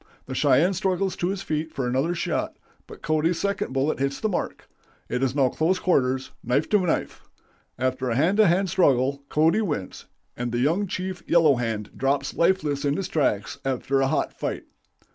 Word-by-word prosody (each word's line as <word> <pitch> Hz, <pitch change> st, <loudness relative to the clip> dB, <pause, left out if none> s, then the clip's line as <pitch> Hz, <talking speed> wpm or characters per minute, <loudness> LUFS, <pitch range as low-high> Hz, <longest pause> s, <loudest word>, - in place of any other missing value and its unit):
The 130 Hz, -, -6 dB
Cheyenne 145 Hz, +7 st, +3 dB
struggles 190 Hz, +1 st, -1 dB
to 175 Hz, -, -1 dB
his 195 Hz, +1 st, -3 dB
feet 155 Hz, +1 st, -2 dB
for 135 Hz, -, -3 dB
another 135 Hz, +8 st, 0 dB
shot, -, -, -2 dB, 0.3 s
but -, -, -13 dB
Cody's 160 Hz, +2 st, +1 dB
second 200 Hz, -6 st, -1 dB
bullet 135 Hz, +3 st, 0 dB
hits 140 Hz, 0 st, -1 dB
the 220 Hz, -, 0 dB
mark. 185 Hz, -, -4 dB, 0.4 s
It 125 Hz, -, -2 dB
is 135 Hz, 0 st, 0 dB
now 135 Hz, -3 st, +3 dB
close 165 Hz, +8 st, +1 dB
quarters, 130 Hz, -8 st, +1 dB
knife 130 Hz, +6 st, +1 dB
to 210 Hz, -, +4 dB
knife. 180 Hz, -3 st, -1 dB, 0.6 s
After 130 Hz, 0 st, -1 dB
a 115 Hz, -, 0 dB
hand 165 Hz, -, +2 dB
to 215 Hz, -2 st, +6 dB
hand 185 Hz, +3 st, +2 dB
struggle, 140 Hz, -6 st, +2 dB
Cody 160 Hz, +8 st, +3 dB
wins, 145 Hz, -, -4 dB, 0.3 s
and 120 Hz, 0 st, -3 dB
the 120 Hz, -, -1 dB
young 165 Hz, +11 st, +1 dB
chief 185 Hz, -1 st, -4 dB
Yellow 165 Hz, -4 st, +5 dB
Hand 110 Hz, -3 st, -3 dB
drops 135 Hz, +1 st, 0 dB
lifeless 155 Hz, -5 st, +1 dB
in 145 Hz, 0 st, +1 dB
his 190 Hz, -2 st, -3 dB
tracks 105 Hz, -10 st, 0 dB
after 135 Hz, +1 st, 0 dB
a 135 Hz, -, +2 dB
hot -, -, -1 dB
fight. -, -, -4 dB
150 Hz, 185 wpm, -25 LUFS, 130-180 Hz, 0.6 s, to